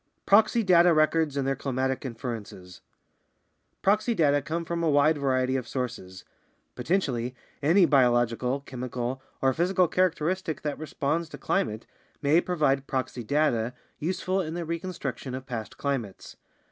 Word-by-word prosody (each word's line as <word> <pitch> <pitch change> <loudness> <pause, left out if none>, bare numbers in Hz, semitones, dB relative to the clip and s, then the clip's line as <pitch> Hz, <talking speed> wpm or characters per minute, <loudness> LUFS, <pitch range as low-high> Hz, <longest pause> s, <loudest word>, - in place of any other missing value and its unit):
Proxy 215 +3 +4
Data 175 -3 +5
Records 155 -1 +2
and 135 - 0
Their 135 - +1
Climatic 130 -1 -2
Inferences 115 -7 -7 1.0
Proxy 215 +4 +2
data 145 -5 +3
come 165 +4 -3
from 170 0 -2
a 165 - +2
wide 145 +1 +3
variety 130 -1 +1
of 130 -3 -2
sources; 115 -8 -5 0.5
potentially, 125 -4 -1 0.3
any 170 +6 +5
bio 135 -6 +5
logical, 120 +3 0
chemical, 125 -1 -4 0.2
or 135 0 +4
physical 180 +3 +2
characteristic 180 -1 0
that 150 -2 -3
responds 155 +1 -2
to - - -9
climate 110 - -1 0.3
may 155 +4 +3
provide 145 -7 0
proxy 130 -2 -3
data 125 -3 +1 0.2
useful 185 +3 -1
in 160 -2 -4
the 175 -1 -3
reconstruction 160 -7 -4
of 130 0 -7
past 115 -5 -6
climates. 130 -9 -4
140 Hz, 140 wpm, -27 LUFS, 125-170 Hz, 1.0 s, Data